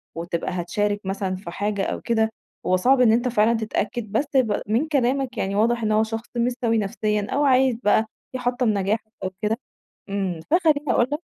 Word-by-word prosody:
وتبقى 170 +1 -3
هتشارك 205 +4 -1
مثلًا 190 -1 -2
في 185 -2 -8
حاجة 205 +1 -1
أو - - -3
كده، 220 -1 +1 0.4
هو 185 - +3
صعب 255 +6 +4
إن 225 -3 +6
أنت 240 +2 +2
فعلًا 230 -1 +3
تتأكد 220 0 -3
بس 250 +7 +1
ب 220 -5 +2
من 235 +9 +1
كلامك 265 -3 0
يعني 195 +1 -1
واضح 235 +2 +2
إن 215 - +1
هو 215 +1 +4
شخص 225 +1 -5
مش 240 +1 +2
سوي 230 -1 +2
نفسيًا، 210 0 -1
أو 290 - +1
عايز 260 -2 +4
بقى 215 +2 +4 0.3
يحطّم 245 -1 0
نجاحك 210 +2 -1
أو 185 - -2
كده، 215 +2 0 0.5
إمم، 190 -4 -2
فخلّيني 310 -4 +3
أقول 240 - +3
لك 295 - -1
220 Hz, 190 wpm, -23 LUFS, 205-245 Hz, 0.5 s, إن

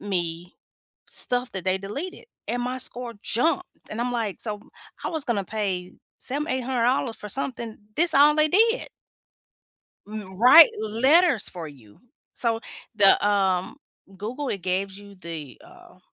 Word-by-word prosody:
me, 175 -3 -3 0.6
stuff 245 0 -2
that 190 -2 -4
they 185 0 +2
deleted 280 - -6 0.2
and 245 0 -2
my 250 +1 -3
score 245 -1 -5
jumped, 325 +10 +1 0.3
and 220 - -3
I'm 245 +1 -1
like, 225 -5 -3
"So 215 -2 -3
w 205 - -21 0.4
I - - -1
was 320 -4 -2
gonna 205 -5 -1
pay 190 -4 -3 0.2
7, 290 +3 -2
$800 255 -1 0
for 210 - -8
something. 235 -2 -4 0.2
This 345 +2 +5
all 295 +2 +6
they 305 0 +5
did." 455 +6 +3 1.2
M 205 -3 -8
write 260 +8 +9
letters 255 - +3
for 170 -3 -7
you. 115 -8 -17 0.4
So 230 -1 +1 0.3
the, 200 -1 +5
um 190 -1 +1 0.4
Google, 250 +7 -4
it 195 - -3
gaves 190 +1 -2
you 200 0 -14
the, 165 -6 -8
uh, 355 - -17
225 Hz, 150 wpm, -24 LUFS, 195-265 Hz, 1.2 s, write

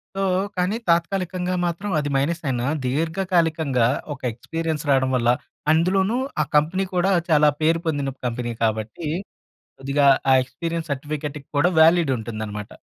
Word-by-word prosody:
So, 195 - -1 0.3
కానీ 180 +4 0
తాత్కాలికంగా 180 +1 0
మాత్రం 175 +4 -3
అది 145 -1 -2
మైనస్ 160 +5 -1
అయినా 125 -2 -1 0.2
దీర్ఘకాలికంగా, 160 -3 +1 0.3
ఒక 140 - -12
ఎక్స్‌పీరియెన్స్ 160 +5 -4
రావడం 130 -1 +3
వల్ల, 120 -1 +2 0.4
అందులోనూ 190 +7 +2 0.2
ఆ - - +3
కంపెనీ 165 +6 +2
కూడా 180 +2 +2 0.2
చాలా 150 -1 +5
పేరు 165 +2 +3
పొందిన 140 -3 -1
కంపెనీ 120 0 -3
కాబట్టి. 110 +7 -2 0.7
కొద్దిగా 140 +1 +2 0.2
ఆ - - +7
ఎక్స్‌పీరియెన్స్ 165 +4 -5
సర్టిఫికేట్ 150 +1 -5 0.2
కూడా 170 +5 +4
వాలిడ్ 165 -2 +5
ఉంటుందన్నమాట. 110 -2 -6
155 Hz, 130 wpm, -23 LUFS, 135-170 Hz, 0.7 s, ఆ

